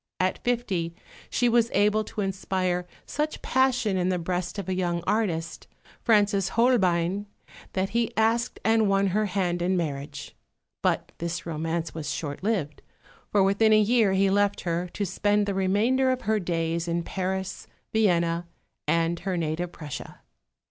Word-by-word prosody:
At 185 Hz, 0 st, 0 dB
fifty 195 Hz, -9 st, -1 dB, 0.3 s
she 245 Hz, -, +2 dB
was 235 Hz, -1 st, +3 dB
able 210 Hz, +2 st, +3 dB
to 210 Hz, -, -5 dB
inspire 185 Hz, -2 st, -1 dB, 0.2 s
such 300 Hz, +1 st, -3 dB
passion 250 Hz, -6 st, +2 dB
in 180 Hz, 0 st, +1 dB
the 185 Hz, -, +1 dB
breast 175 Hz, +2 st, -3 dB
of 200 Hz, -, -4 dB
a 190 Hz, -, 0 dB
young 175 Hz, -2 st, -1 dB
artist, 175 Hz, -7 st, -1 dB, 0.3 s
Francis 205 Hz, -4 st, +3 dB
Holbein, 195 Hz, -5 st, +2 dB, 0.5 s
that 190 Hz, 0 st, 0 dB
he 230 Hz, +2 st, 0 dB
asked 230 Hz, +2 st, +1 dB
and 220 Hz, -2 st, +4 dB
won 195 Hz, 0 st, +3 dB
her 215 Hz, +1 st, +2 dB
hand 180 Hz, -2 st, -1 dB
in 185 Hz, +1 st, +1 dB
marriage. 145 Hz, -4 st, -4 dB, 0.5 s
But -, -, 0 dB
this 170 Hz, 0 st, -3 dB
romance 165 Hz, 0 st, -2 dB
was 160 Hz, -2 st, -5 dB
short 145 Hz, -3 st, -4 dB
lived, 190 Hz, -9 st, -1 dB, 0.5 s
for 200 Hz, -2 st, +4 dB
within 205 Hz, +3 st, +4 dB
a 215 Hz, -, +6 dB
year 215 Hz, -2 st, +3 dB
he 195 Hz, 0 st, +3 dB
left 205 Hz, 0 st, +2 dB
her, 175 Hz, +1 st, -2 dB
to 205 Hz, -, -1 dB
spend 205 Hz, +3 st, +1 dB
the 200 Hz, -, -1 dB
remainder 210 Hz, +8 st, +2 dB
of 255 Hz, 0 st, 0 dB
her 215 Hz, +1 st, +1 dB
days 170 Hz, -2 st, -1 dB
in 170 Hz, 0 st, -1 dB
Paris, 190 Hz, +1 st, -3 dB, 0.3 s
Vienna, 170 Hz, -5 st, +2 dB, 0.4 s
and 165 Hz, +2 st, +1 dB
her 185 Hz, 0 st, -2 dB
native 165 Hz, +2 st, -2 dB
Prussia. 150 Hz, -5 st, -8 dB
190 Hz, 155 wpm, -26 LUFS, 170-215 Hz, 0.5 s, a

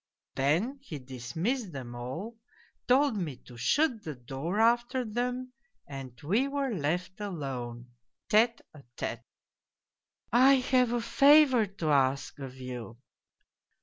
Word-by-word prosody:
" -, -, -63 dB
Then 175 Hz, -, +1 dB
he 175 Hz, -, -7 dB
dismissed 160 Hz, -, -3 dB
them 125 Hz, -3 st, -7 dB
all, 130 Hz, -, -6 dB, 0.5 s
told 270 Hz, 0 st, +4 dB
me 160 Hz, -8 st, -3 dB
to 125 Hz, -, -13 dB
shut 240 Hz, -, +1 dB
the 155 Hz, -3 st, -5 dB
door 135 Hz, -, -4 dB
after 240 Hz, +2 st, +2 dB
them, 250 Hz, +3 st, -3 dB, 0.3 s
and 135 Hz, -3 st, -9 dB
we 215 Hz, -, +2 dB
were 275 Hz, -3 st, -1 dB
left 180 Hz, +3 st, -2 dB
alone, 125 Hz, -10 st, -5 dB, 0.4 s
tle 220 Hz, +2 st, +6 dB, 0.3 s
a 150 Hz, -, -13 dB, 0.2 s
tfre. -, -, -3 dB, 0.4 s
" -, -, -63 dB
' -, -, -50 dB
I 260 Hz, +3 st, +7 dB
have 255 Hz, -2 st, +2 dB
a 240 Hz, -1 st, 0 dB
favour 265 Hz, -1 st, +5 dB
to 175 Hz, -5 st, -2 dB
ask 135 Hz, +1 st, +1 dB
of 135 Hz, -2 st, -7 dB
you.' 125 Hz, -3 st, -7 dB
185 Hz, 140 wpm, -29 LUFS, -, 0.5 s, I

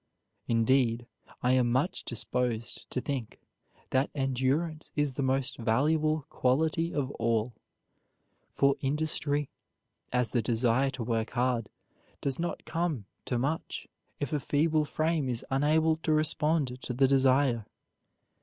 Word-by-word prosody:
Indeed, 115 Hz, 0 st, +2 dB, 0.4 s
I 125 Hz, -, +3 dB
am 125 Hz, -2 st, +3 dB
much 145 Hz, +10 st, 0 dB
disposed 115 Hz, 0 st, -2 dB
to 125 Hz, -, -2 dB
think 130 Hz, -6 st, -4 dB, 0.5 s
that 130 Hz, +2 st, +2 dB
endurance 135 Hz, +4 st, 0 dB
is 145 Hz, -2 st, +1 dB
the 135 Hz, -, -3 dB
most 130 Hz, -1 st, 0 dB
valuable 150 Hz, +6 st, +2 dB
quality 160 Hz, +6 st, +1 dB
of 140 Hz, -2 st, -1 dB
all; 115 Hz, +1 st, +1 dB, 1.0 s
for 140 Hz, 0 st, +2 dB
industry, 145 Hz, 0 st, -1 dB, 0.6 s
as 125 Hz, -3 st, +1 dB
the 120 Hz, -, +2 dB
desire 120 Hz, +4 st, +2 dB
to 130 Hz, -3 st, -5 dB
work 115 Hz, -1 st, -1 dB
hard, 125 Hz, -2 st, 0 dB, 0.5 s
does 135 Hz, +1 st, -1 dB
not 170 Hz, +1 st, -3 dB
come 165 Hz, -, -1 dB, 0.2 s
to 125 Hz, -, -1 dB
much 140 Hz, +6 st, -2 dB, 0.3 s
if 145 Hz, -1 st, -3 dB
a 150 Hz, -, +2 dB
feeble 155 Hz, +3 st, +2 dB
frame 155 Hz, -2 st, 0 dB
is 120 Hz, -2 st, -3 dB
unable 155 Hz, +4 st, +3 dB
to 160 Hz, 0 st, -1 dB
respond 155 Hz, -4 st, +1 dB
to 125 Hz, -, -4 dB
the 135 Hz, +2 st, +4 dB
desire. 130 Hz, -4 st, +3 dB
135 Hz, 130 wpm, -29 LUFS, 125-150 Hz, 1.0 s, the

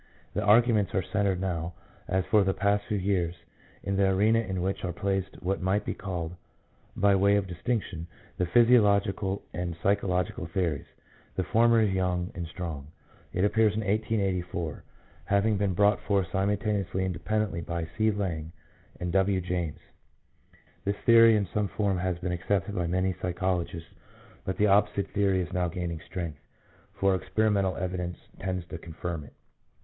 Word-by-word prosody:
The 105 Hz, -, -1 dB
arguments 110 Hz, -1 st, +4 dB
are 95 Hz, -, +2 dB
centred 100 Hz, -1 st, 0 dB
now, 85 Hz, -2 st, -2 dB, 0.3 s
as 95 Hz, 0 st, 0 dB
for 105 Hz, -2 st, +4 dB
the 95 Hz, 0 st, 0 dB
past 100 Hz, +1 st, +1 dB
few 105 Hz, -, 0 dB
years, 90 Hz, -3 st, 0 dB, 0.5 s
in 95 Hz, +1 st, -1 dB
the 100 Hz, -1 st, +4 dB
arena 105 Hz, +4 st, +3 dB
in 95 Hz, -5 st, -2 dB
which 95 Hz, +1 st, -2 dB
are 90 Hz, -, -1 dB
placed 95 Hz, +1 st, -2 dB
what 95 Hz, +2 st, -1 dB
might 95 Hz, +3 st, +1 dB
be -, -, -2 dB
called 90 Hz, -3 st, -4 dB, 0.6 s
by 100 Hz, +1 st, +4 dB
way 100 Hz, +1 st, +4 dB
of 100 Hz, -1 st, +1 dB
distinction 90 Hz, -2 st, -3 dB, 0.3 s
the 90 Hz, -, 0 dB
physiological 100 Hz, -3 st, +3 dB
and 85 Hz, -1 st, -3 dB
psycho 100 Hz, 0 st, +2 dB
logical 90 Hz, -2 st, -1 dB
theories. 85 Hz, -5 st, -1 dB, 0.5 s
The 95 Hz, -, 0 dB
former 115 Hz, +4 st, +4 dB
is 105 Hz, -3 st, +2 dB
young 90 Hz, -1 st, 0 dB
and 85 Hz, -1 st, -5 dB
strong. 80 Hz, -5 st, -6 dB, 0.4 s
It 90 Hz, +3 st, +1 dB
appeared 110 Hz, 0 st, +3 dB
in 110 Hz, -, -1 dB
1884, 95 Hz, -6 st, -1 dB, 0.4 s
having 100 Hz, +1 st, +2 dB
been 100 Hz, -2 st, 0 dB
brought 105 Hz, +2 st, +3 dB
forth 100 Hz, -4 st, 0 dB
simultaneously 100 Hz, -1 st, 0 dB
and 95 Hz, -, -1 dB
independently 100 Hz, +1 st, -1 dB
by 85 Hz, 0 st, -3 dB
C. 110 Hz, 0 st, +3 dB
Lange 90 Hz, -6 st, -2 dB, 0.5 s
and 90 Hz, -1 st, -2 dB
W. 95 Hz, 0 st, +2 dB
James. 85 Hz, -4 st, -2 dB, 1.1 s
This 100 Hz, +1 st, -1 dB
theory 115 Hz, -1 st, +8 dB
in 105 Hz, -2 st, +1 dB
some 105 Hz, -1 st, +1 dB
form 100 Hz, -2 st, 0 dB
has 90 Hz, -1 st, -1 dB
been 90 Hz, 0 st, -3 dB
accepted 95 Hz, +3 st, -1 dB
by 90 Hz, -3 st, -1 dB
many 95 Hz, +2 st, +1 dB
psychologists, 90 Hz, -2 st, -2 dB, 0.6 s
but 95 Hz, -, -2 dB
the 105 Hz, -, +3 dB
opposite 100 Hz, 0 st, +3 dB
theory 95 Hz, -2 st, +2 dB
is 85 Hz, -, -8 dB
now 90 Hz, -1 st, +1 dB
gaining 85 Hz, -1 st, -4 dB
strength, 85 Hz, -6 st, -5 dB, 0.5 s
for 95 Hz, 0 st, +2 dB
experimental 95 Hz, 0 st, +1 dB
evidence 90 Hz, -1 st, -3 dB, 0.2 s
tends 90 Hz, -2 st, -3 dB
to 80 Hz, -, -6 dB
confirm 85 Hz, -1 st, -5 dB
it. -, -, -16 dB
95 Hz, 165 wpm, -28 LUFS, 90-100 Hz, 1.1 s, theory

